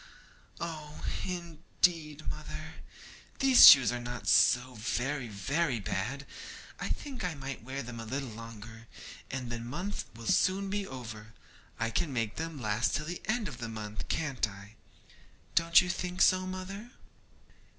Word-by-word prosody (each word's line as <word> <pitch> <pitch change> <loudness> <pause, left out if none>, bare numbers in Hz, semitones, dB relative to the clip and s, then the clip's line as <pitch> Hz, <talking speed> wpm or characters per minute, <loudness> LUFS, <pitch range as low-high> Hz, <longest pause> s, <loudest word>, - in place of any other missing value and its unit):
Oh, 155 -3 -6 0.2
indeed, 165 -2 -1
mother, 155 +1 -6 0.6
these 265 -2 +9
shoes 130 -5 +10
are 125 - -3
not 120 0 -6
so 125 +1 +5
very 125 +4 -2
very 125 - -1
bad! 120 +8 -3 0.5
I - - -3
think 270 -6 -4
I 180 -3 -2
might 135 -1 -6
wear 135 +3 -5
them 120 -1 -7
a 115 - -6
little 135 +3 -3
longer, 115 0 -10 0.4
and 125 -2 -4
the 120 - -3
month 175 - -4
will 115 0 -10
soon 195 - +2
be 200 -1 -2
over. 110 -4 -8 0.4
I 115 0 0
can 150 +6 0
make 115 -4 -2
them 165 -2 -4
last 105 -4 +1
till 150 - -2
the 175 +2 -5
end 220 0 0
of - - -8
the 115 -1 -4
month, 105 -1 -6
can't 145 -8 0
I? 100 +1 -12 0.8
Don't 170 0 +6
you 180 - -3
think 180 0 0
so, 185 0 +4
mother?' 190 +4 -6
135 Hz, 150 wpm, -31 LUFS, 115-170 Hz, 0.8 s, shoes